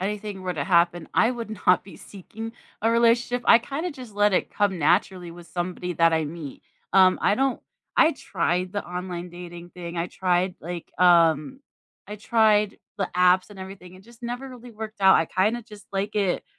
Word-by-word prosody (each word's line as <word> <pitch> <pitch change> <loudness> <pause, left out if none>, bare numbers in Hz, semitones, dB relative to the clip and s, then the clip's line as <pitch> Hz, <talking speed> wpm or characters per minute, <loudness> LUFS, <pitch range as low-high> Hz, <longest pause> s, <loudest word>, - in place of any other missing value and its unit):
anything 205 0 -4
were 180 -1 -3
to 145 -3 -2
happen, 170 -1 +2
I 230 - +4
would 235 -3 -6 0.2
not 180 - +4
be 195 - -13
seeking 220 +3 -9 0.3
a 225 - +3
relationship, 235 +1 +2
I - - +8
kinda 280 +9 -4
just 250 -8 -11
let 205 0 +3
it - - 0
come 200 -3 0
naturally 175 +3 +1
with 170 0 -12
somebody 180 0 -4
that 165 0 +4
I 160 -1 +1
meet, 150 -2 -8 0.3
um, 185 -1 +5
I - - +3
don't 265 +2 0 0.4
I 320 - +6
tried 180 - -2
the 205 - -3
online 180 0 -6
dating 175 0 -10
thing, 175 -1 -8
I 170 +1 -1
tried, 180 0 0
like, 170 +1 -7
um 170 - +4 0.5
I 210 - -7
tried 210 -1 +2 0.2
the 195 - -1
apps 180 +2 +4
and 205 - -12
everything, 190 -1 -10
it 185 - -15
just 235 +1 -19
never 245 +3 -5
really 250 -1 -11
worked 220 -1 -8
out, 190 -1 +7
I 165 - +1
kinda 215 +8 0
just 210 -3 -14
like 200 +2 -2
it 195 -4 0
190 Hz, 190 wpm, -24 LUFS, 175-220 Hz, 0.5 s, I